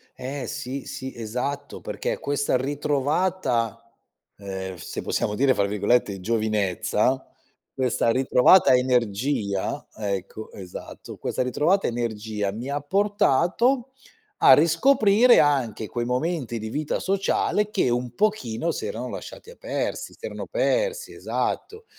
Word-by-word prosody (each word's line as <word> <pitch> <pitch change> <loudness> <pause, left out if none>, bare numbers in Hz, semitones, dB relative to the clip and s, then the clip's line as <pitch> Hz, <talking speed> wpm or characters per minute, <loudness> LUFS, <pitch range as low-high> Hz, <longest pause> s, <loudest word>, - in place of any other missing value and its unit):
Eh 130 +1 -5
sì, 130 +4 -5
sì, 130 0 -6
esatto, 125 +5 -4
perché - - -3
questa 145 -1 0
ritrovata, 140 -2 0 0.6
ehm, 95 -2 -6
se 85 - -6
possiamo 105 - -1
dire 130 +4 +3
fra 100 - +2
virgolette, 105 0 +1
"giovinezza", 110 +3 0 0.5
questa 125 -2 +1
ritrovata 130 +5 +5
energia 120 -4 0
ecco, 100 0 -4
esatto, 95 -3 -9
questa - - -2
ritrovata 150 +10 +2
energia 110 -3 -2
mi 115 +6 -6
ha 145 +1 -1
portato 205 - +2 0.5
a - - +8
riscoprire 220 - +5
anche 125 -7 +1
quei 120 +2 -3
momenti 125 -2 -2
di 110 0 -5
vita 150 +5 -2
sociale 200 +2 0
che, 190 -11 +1
un 120 0 -1
pochino, 170 - 0
si 420 - -3
erano 475 - -4
lasciati - - -9
a - - -12
persi, - - -4
si - - -23
erano - - -6
persi, - - 0
esatto; 445 +1 -3
130 Hz, 125 wpm, -24 LUFS, 110-175 Hz, 0.6 s, a